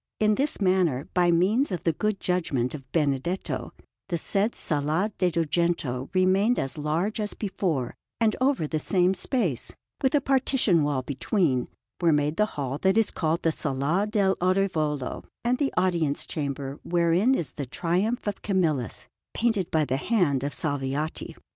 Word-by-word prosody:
In 215 0 +4
this 280 +7 0
manner, 180 -8 +2
by 175 -1 +3
means 195 +10 +2
of 180 - -3
the 165 - +2
good 210 +4 -1
judgment 145 -9 0
of 135 -3 -9
Benedetto, 150 +3 -1 0.4
the 175 - 0
said 200 +7 0
Sala 155 +7 0
de' 180 - +3
Dugento 165 -6 -1
remained 190 +6 +3
as 135 +2 -2
large 165 +9 -1
as 210 -1 -3
before, 175 - -2 0.3
and 220 -2 +2
over 260 - +2
the 155 +1 -2
same 180 +3 +2
space, 180 - -1 0.3
with 265 +1 +2
a - - +5
partition 265 - +2
wall 145 -3 0
between, 140 - 0 0.3
were 170 -2 +4
made 150 +1 +1
the 210 - +3
hall 140 0 -2
that 190 +4 +2
is 225 -2 +3
called 160 +1 -1
the 165 - +3
Sala 150 +7 0
dell' 200 -3 +1
Orivolo 160 -7 0 0.2
and 250 +1 +1
the 285 -2 +1
Audience 170 -6 +1
Chamber 140 -1 -4
wherein 175 +8 +2
is 165 - -2
the 140 - -6
Triumph 185 - -1
of 205 -1 -3
Camillus, 160 - -1 0.3
painted 225 -6 +1
by 155 -1 +2
the 130 -1 -1
hand 150 - +1
of 145 - -2
Salviati. 145 0 -2
170 Hz, 160 wpm, -26 LUFS, 145-200 Hz, 0.4 s, a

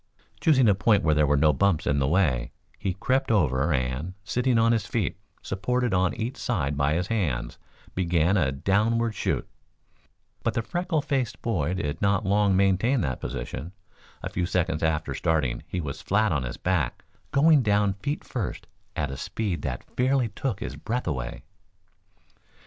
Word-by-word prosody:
Choosing 135 -8 +4
a 105 - +6
point 105 +1 +3
where 80 - +3
there 75 0 +3
were 75 +1 +3
no 75 +1 +4
bumps 95 0 +2
in 70 0 +2
the 65 - +1
way, 75 -8 +1 0.3
he 95 -2 -2
crept 130 +7 0
over 75 - +2
and, 65 +6 -1
sitting 125 +4 +1
on 115 0 +4
his 110 -4 0
feet, 105 -8 -2 0.2
supported 125 +5 -1
on 90 -1 +2
each 115 +4 -4
side 75 - -1
by 70 +2 +1
his 90 +2 0
hands, 85 - -2 0.3
began 90 0 +2
a 75 -9 +2
downward 110 +10 +1
shoot. - - -1 0.9
But - - -1
the 115 - 0
freckle 175 +1 -1
faced 135 -6 -2
boy 90 -7 0
did 75 -3 -3
not 100 +1 +2
long 100 -1 +3
maintain 100 +7 +3
that 65 -6 -2
position. 65 +7 -5 0.5
A - - -3
few 90 -1 -1
seconds 90 -4 0
after 80 -1 0
starting 75 -8 0
he 90 - -3
was 70 -5 -5
flat 105 0 +2
on 75 -4 +1
his 60 -1 -5
back, 90 -9 -1 0.3
going 150 +1 +5
down 105 -3 +2
feet 120 +10 -4
first 115 -8 -4 0.3
at 75 -3 -1
a 70 - -6
speed 100 -1 -3
that 65 -2 -4
fairly 130 -1 +2
took 110 0 -3
his - - -4
breath 125 +3 -3
away. 65 -6 -4
95 Hz, 170 wpm, -26 LUFS, 75-115 Hz, 0.9 s, a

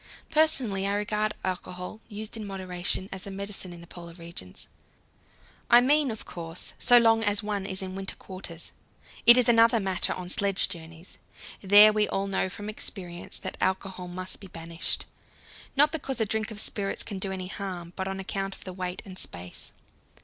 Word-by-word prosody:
Personally, 260 -11 +3
I 200 - +1
regard 210 +1 0
alcohol, 180 +2 -4
used 215 0 -7
in 220 - -5
moderation, 185 -1 -3
as 195 0 -6
a - - -4
medicine 195 -1 -4
in 170 -1 -10
the - - -11
Polar 170 0 -10
regions 165 - -9 1.0
I 240 - +9
mean, 285 +3 +4
of 220 -2 -5
course, 165 0 -7
so 245 - +6
long 225 -1 +5
as 205 0 +2
one 205 -2 -2
is 190 0 -3
in 185 0 -5
winter 195 0 -4
quarters. 180 -3 -7 0.6
It 240 +1 +12
is 250 - +5
another 230 0 +6
matter 190 -3 +1
on 180 -1 -6
sledge 195 +1 +3
journeys: 165 +1 -9 0.4
there 205 +2 +8
we 210 0 +3
all 195 - 0
know 195 -1 0
from 205 +2 -7
experience 180 -5 -5
that - - -6
alcohol 190 -1 -1
must 185 +1 -6
be 195 - -10
banished 165 -1 -4 0.7
not 295 +2 +5
because 275 -5 -3
a 220 - +3
drink 220 +2 -1
of 215 -2 -7
spirits 200 -2 0
can 200 -3 -5
do 190 0 -2
any 185 -1 -4
harm, 180 -4 -5
but 190 -1 -3
on 195 0 -3
account 195 0 -3
of - - -14
the 185 - -7
weight 180 0 -4
and 185 -2 -3
space. 90 0 -5
195 Hz, 185 wpm, -28 LUFS, 180-215 Hz, 1.0 s, It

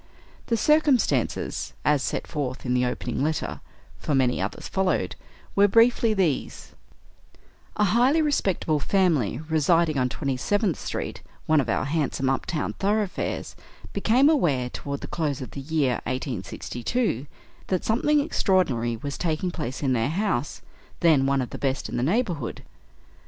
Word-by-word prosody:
The 230 - +1
circumstances, 300 0 +1
as 150 -2 +3
set - - -2
forth 135 -5 -4
in 125 - 0
the 125 0 +2
opening 125 0 -3
letter 155 +1 -2 0.4
(for 150 - -1
many 125 -6 +2
others 95 - -4
followed) 185 - 0 0.4
were 200 +1 +6
briefly 230 +2 +4
these: 175 -8 -1 1.0
A 210 - +2
highly 245 - +4
respectable 195 - +1
family 155 - +1
residing 160 -1 +2
on 125 0 +1
Twenty 135 -1 -2
seventh 205 - 0
Street, - - -4 0.2
one 155 -1 +4
of 120 - -4
our - - 0
handsome 140 -3 0
up 135 - -2
town 160 -4 -2
thoroughfares, 205 0 -1 0.4
became 255 +5 +3
aware, 145 - +2
toward 140 0 -5
the - - -6
close 150 -5 -2
of 130 - -7
the 140 - -6
year 140 -3 0
1862, 130 - -2 0.4
that 185 -2 -1
something 290 +7 +3
extraordinary 165 - +1
was 140 +4 -5
taking 170 +1 -1
place 150 -5 -5
in 130 -2 +2
their 115 +2 +1
house, 175 - -1 0.4
then 150 -6 +4
one 135 -1 +2
of 125 - -8
the - - -6
best 135 -1 -1
in 120 - -3
the - - 0
neighborhood. 170 - -1
155 Hz, 150 wpm, -25 LUFS, 130-200 Hz, 1.0 s, were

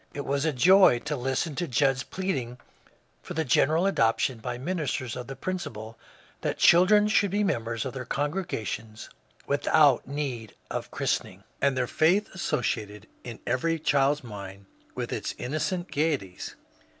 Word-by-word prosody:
It 145 - -4
was 140 +2 0
a 160 - +2
joy 185 +2 +6
to 150 - -1
listen 135 +4 -1
to 175 - -1
Judd's 135 0 +2
pleading 135 -9 -3 0.6
for - - -8
the 160 0 0
general 155 +7 +3
adoption 115 -7 +1
by 120 +2 -4
min 180 +8 -3
isters 130 -4 -2
of 125 -1 -6
the 135 - -6
principle 115 -9 -5 0.5
that - - -2
children 195 +5 +6
should 205 -1 +3
be 205 +3 0
members 115 - -1
of 130 - -4
their 130 -1 -5
congregations 125 - -4 0.3
without 140 -2 +3
need 130 -6 -4 0.2
of - - -4
christening, - - -2 0.2
and 140 -2 +2
their 130 - +1
faith 180 - +2
associated 105 - -2 0.2
in 120 -2 -8
every 165 +7 0
child's 145 -1 +2
mind 100 -3 -9 0.3
with - - -3
its - - -3
innocent 175 +7 -3
gaie 155 0 +2
ties. 95 -6 -9
135 Hz, 155 wpm, -27 LUFS, 120-165 Hz, 0.6 s, joy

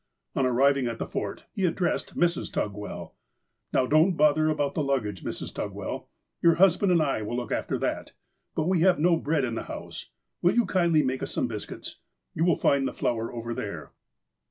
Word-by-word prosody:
On 135 - +2
arriving 135 +1 +3
at 115 -1 -3
the - - -3
Fort, 100 - -4
he 195 - -2
addressed 175 0 -1
Mrs. 175 0 +1
Tugwell: 105 0 -4 0.3
" - - -52
Now, 130 - +3
don't 155 +7 +4
bother 150 +1 +4
about 145 -2 0
the 155 - -1
luggage, 120 - -1
Mrs. - - -5
Tugwell! - - -5 0.3
Your 170 -1 +5
husband 190 +1 +4
and 170 -3 +4
I 135 -6 0
will 110 +3 -3
look 120 -3 -4
after - - -1
that. - - -3 0.4
But 155 - 0
we 185 -2 +2
have 180 +1 +4
no 170 +3 +4
bread 155 -3 0
in 120 - -3
the - - -2
house. - - -7 0.3
"Will 175 - +3
you 240 -2 +4
kindly 170 -4 +3
make 130 0 -1
us - - -4
some - - 0
biscuits! - - -7 0.3
You 165 - +1
will 175 -3 +3
find 140 -1 +2
the - - -4
flour 115 -1 -1
over 115 0 -4
there." 85 -11 -6
145 Hz, 200 wpm, -27 LUFS, 120-170 Hz, 0.4 s, Your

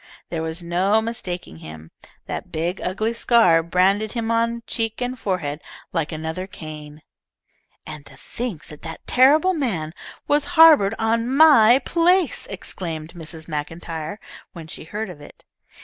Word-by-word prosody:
There 165 -2 -3
was 160 +2 -4
no 185 +5 +2
mistaking 185 - -5
him. 80 0 -11 0.3
That - - -6
big, 170 +4 -3
ugly 215 +5 -1
scar 230 -8 +4
branded 190 +5 +1
him 230 -2 -2
on 230 0 0
cheek 225 -2 -3
and 250 0 -2
forehead 165 -7 -3 0.3
like 165 -3 -1
another 160 +4 -5
Cain. 155 -3 -10 0.8
"And 150 - -8
to 135 - -15
think 230 - -6
that 150 - -13
that 165 0 -8
terrible 300 +8 +4
man 190 - -2 0.3
was 290 0 +2
harboured 300 -11 +7
on 230 +1 0
my 265 -5 +7
place!" 345 -2 +2
exclaimed 165 -4 -5
Mrs. 160 -2 -9
MacIntyre 165 +4 -5 0.3
when 165 -2 -9
she 155 - -10
heard 210 +3 -5
of 150 - -13
it. - - -15
185 Hz, 145 wpm, -22 LUFS, 160-230 Hz, 0.8 s, harboured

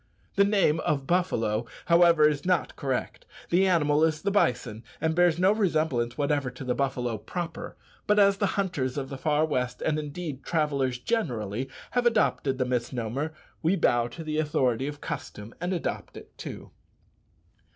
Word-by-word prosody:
The 200 - +5
name 200 -6 +3
of 140 -4 -1
buffalo, 120 -11 0 0.2
however, 170 -2 +6
is 150 -2 -1
not 180 -3 0
correct. 135 -2 -3 0.2
The 185 +3 +4
animal 155 -4 +3
is 155 -1 +2
the 200 - +1
bison, 125 - 0 0.2
and 160 +1 +1
bears 175 -1 +3
no 185 +2 +4
resemblance 155 - 0
whatever 145 -2 0
to 135 - -9
the 125 -1 0
buffalo 125 -4 -1
proper; 170 - -6 0.3
but 210 - +3
as 200 -1 +5
the 200 - +1
hunters 150 -10 -1
of 135 -1 -3
the 135 - -6
far 150 +1 +2
west, 125 -5 -2
and, 155 -1 +1
indeed, 150 -2 -6
travellers 140 -6 0
generally, 125 - -2 0.2
have 245 -1 +2
adopted 210 - +1
the 130 - 0
misnomer, 125 +3 -2 0.3
we 170 +4 +2
bow 120 -9 +2
to 165 +7 -8
the 155 0 -2
authority 135 -4 +1
of 145 0 -6
custom 105 +2 -6
and 175 +1 -1
adopt 175 -3 -3
it - - -13
too. - - -8
150 Hz, 165 wpm, -27 LUFS, 125-175 Hz, 0.3 s, however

